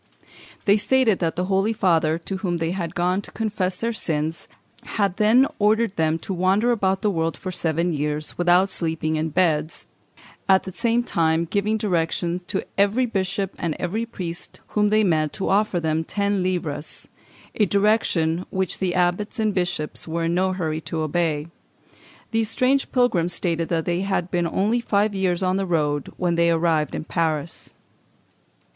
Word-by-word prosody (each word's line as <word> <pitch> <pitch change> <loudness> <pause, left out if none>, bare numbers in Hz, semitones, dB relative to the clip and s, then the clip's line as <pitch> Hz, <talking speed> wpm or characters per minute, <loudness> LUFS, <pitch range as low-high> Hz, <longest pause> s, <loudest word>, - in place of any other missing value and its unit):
They 200 +1 +5
stated 230 -1 +2
that 165 -2 -1
the 180 - -1
Holy 195 +3 +1
Father, 165 -6 +2
to 190 +3 -5
whom 180 -3 -2
they 165 0 -1
had 175 -2 -4
gone 180 +2 +1
to - - -10
confess 200 -4 -2
their 230 +3 -2
sins, 160 -5 -2 0.5
had 200 -3 +1
then 225 +5 +5
ordered 215 0 +2
them 160 0 +1
to 195 - -3
wander 190 +6 +2
about 195 -3 0
the 210 - +2
world 165 -4 -1
for 185 - -5
seven 170 0 0
years, 150 0 -2
without 175 +2 +3
sleeping 160 -3 -1
in 155 +1 -1
beds, 160 -2 0 0.6
at 190 0 +5
the 190 - -8
same 235 +2 +1
time 165 -5 +1
giving 205 +5 0
direction 175 -3 -1
to 195 - -1 0.2
every 205 +6 +3
bishop 195 -3 -2
and 165 -3 -2
every 205 +6 -2
priest 175 -7 -5
whom 210 -1 +2
they 215 +1 +3
met 155 -5 +1
to 195 - -2
offer 200 -2 +2
them 160 -1 0
ten 200 +2 -1
livres; 175 -5 -3 0.5
a 210 - +2
direction 185 -5 +1
which 190 -2 -2
the 185 -2 -1
abbots 180 +6 0
and 215 -2 +1
bishops 175 -5 -2
were 165 +1 -2
in 165 +1 0
no 185 +2 +1
hurry 160 -4 -2
to 160 0 -4
obey. 155 -1 0 0.9
These 225 -1 +1
strange 265 +4 +1
pilgrims 180 -9 +2
stated 165 -2 0
that 165 -2 0
they 175 +1 0
had 190 -2 -1
been 175 -1 +1
only 210 +8 +1
five 205 -2 +1
years 190 -2 0
on 185 +1 +1
the 195 -1 -1
road 150 -4 0
when 175 -2 0
they 170 0 +3
arrived 165 -3 +1
in - - -4
Paris. 160 -1 -3
180 Hz, 175 wpm, -23 LUFS, 165-205 Hz, 0.9 s, They